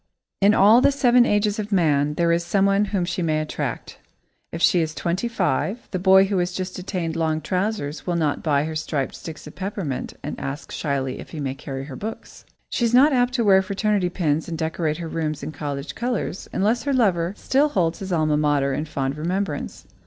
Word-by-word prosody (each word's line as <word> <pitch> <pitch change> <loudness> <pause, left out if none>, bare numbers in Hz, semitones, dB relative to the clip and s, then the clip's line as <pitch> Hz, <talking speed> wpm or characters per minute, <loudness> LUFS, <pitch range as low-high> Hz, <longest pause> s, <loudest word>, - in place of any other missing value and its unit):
In 205 +2 +5
all 215 +5 +6
the 280 - +5
seven 250 -3 +4
ages 205 0 +1
of 210 0 -4
man, 150 -6 +2
there 170 0 +2
is 170 +1 +1
someone 195 +3 +2
whom 195 -3 -1
she 175 +1 -3
may 155 -2 +1
attract. 155 0 -4 0.5
If 165 - -5
she 175 0 +4
is 160 0 -3
twenty 180 +7 -1
five, 205 - -1
the 185 - -2
boy 190 +1 +6
who 195 -1 0
has 180 0 -1
just 185 0 -4
attained 180 -3 -3
long 160 -1 0
trousers 180 -3 -2
will 175 - 0
not 155 -4 0
buy 145 -3 +2
her 160 +1 -4
striped 150 -3 -2
sticks 160 -2 -9
of 150 - -10
peppermint 190 -8 -4
and - - -5
ask 140 +3 -6
shyly 135 -3 -2
if - - -10
he 160 - -7
may 135 -2 -2
carry 135 -1 -6
her 135 -1 -8
books. 220 +7 -8 0.3
She - - -1
is 235 +1 +3
not 280 +4 +6
apt 250 0 +2
to 240 - +1
wear 195 -2 +6
fraternity 200 -1 0
pins 160 -3 -1
and 165 - -4
decorate 160 -1 -1
her 170 -1 -5
rooms 155 -3 -3
in 150 - -4
college 140 -1 -5
colours, 240 -5 -3
unless 220 +5 +1
her 280 +2 -1
lover 190 -6 +1
still 285 +3 +2
holds 170 - 0
his 195 -1 -6
alma 155 -3 +2
mater 145 -2 +1
in 150 +3 -2
fond 135 -2 -2
remembrance. 170 0 -3
175 Hz, 210 wpm, -23 LUFS, 155-200 Hz, 0.5 s, all